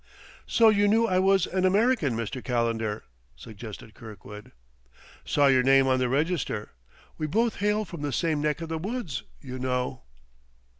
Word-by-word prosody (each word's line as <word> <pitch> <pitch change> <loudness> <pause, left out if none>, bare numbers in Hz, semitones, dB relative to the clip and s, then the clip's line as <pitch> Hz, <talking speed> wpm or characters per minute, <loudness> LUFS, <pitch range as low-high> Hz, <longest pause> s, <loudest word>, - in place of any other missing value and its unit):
"So 225 -1 +5
you 205 -1 +3
knew 225 +3 +3
I 185 -5 +1
was 190 -1 +3
an 185 0 -2
American, 195 - +2
Mr. 115 +2 -4
Calendar?" 115 -3 -1 0.3
suggested 110 0 -10
Kirkwood. 105 -1 -11 0.7
"'Saw 145 - +2
your 130 -2 +5
name 135 +1 +5
on 130 -1 +2
the 125 -1 0
register; 140 -6 -1 0.5
we 155 - -1
both 225 +7 0
hail 210 +1 0
from 170 -5 -9
the 145 -1 -2
same 155 +3 0
neck 150 +2 -1
of 165 - -6
the 160 0 -3
woods, 195 - -4 0.2
you 130 -1 -7
know." 125 0 -2
145 Hz, 160 wpm, -26 LUFS, 125-190 Hz, 0.7 s, So